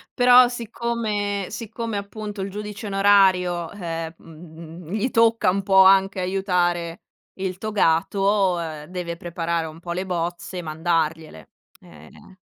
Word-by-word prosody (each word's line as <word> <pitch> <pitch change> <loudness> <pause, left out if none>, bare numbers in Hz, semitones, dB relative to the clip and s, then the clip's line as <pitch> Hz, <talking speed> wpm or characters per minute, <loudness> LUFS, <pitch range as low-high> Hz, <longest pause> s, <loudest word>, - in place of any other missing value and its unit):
Però, 250 0 +7
siccome 225 -4 -3
siccome, 225 +1 -5
appunto, 205 +1 -7
il 195 - -3
giudice 210 +1 -7
onorario, 190 -4 +3
uhm, 165 -4 -5
mhmm, 165 0 -12
gli 215 +5 -1
tocca 230 -3 +3
un 195 +2 0
po' 190 -1 +6
anche 190 0 +4
aiutare 180 -3 -1 0.4
il 185 -1 -3
togato, 195 0 +1
uhm, 160 -3 -5
deve 170 0 -5
preparare 170 -2 -3
un 155 +1 -11
po' 170 - -6
le 180 +2 -3
bozze, 175 0 -4
mandargliele. 160 - -2 0.3
Ehm 80 - -16
185 Hz, 125 wpm, -23 LUFS, 170-205 Hz, 0.4 s, Però